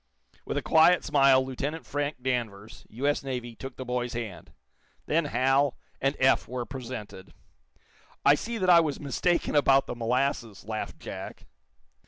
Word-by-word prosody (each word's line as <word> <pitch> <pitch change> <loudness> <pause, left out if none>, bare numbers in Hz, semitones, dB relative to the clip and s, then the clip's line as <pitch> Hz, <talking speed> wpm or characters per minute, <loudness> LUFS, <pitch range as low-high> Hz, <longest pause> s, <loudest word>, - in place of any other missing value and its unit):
With - - -3
a - - -1
quiet 170 +3 +5
smile, 135 -3 +4
Lieutenant 140 +5 -4
Frank 145 -2 -3
Danvers, 115 -5 -4
U.S. 140 +6 -1
Navy, 125 -3 -5
took 135 +2 -8
the 130 - -7
boy's 125 -1 -2
hand. 115 -6 -6 0.5
Then 165 +1 +1
Hal 135 +1 +2 0.2
and 135 +2 +1
Eph 130 0 +3
were 125 -1 -4
presented. 120 -8 -8 0.9
"I 140 - +8
see 230 +10 -3
that 185 -3 -1
I 175 -2 +8
was 155 -4 -1
mistaken 155 +5 0
about 135 -1 +4
the - - -5
molasses," 120 -2 -1
laughed 110 0 -5
Jack. - - -8
130 Hz, 150 wpm, -27 LUFS, 120-145 Hz, 0.9 s, I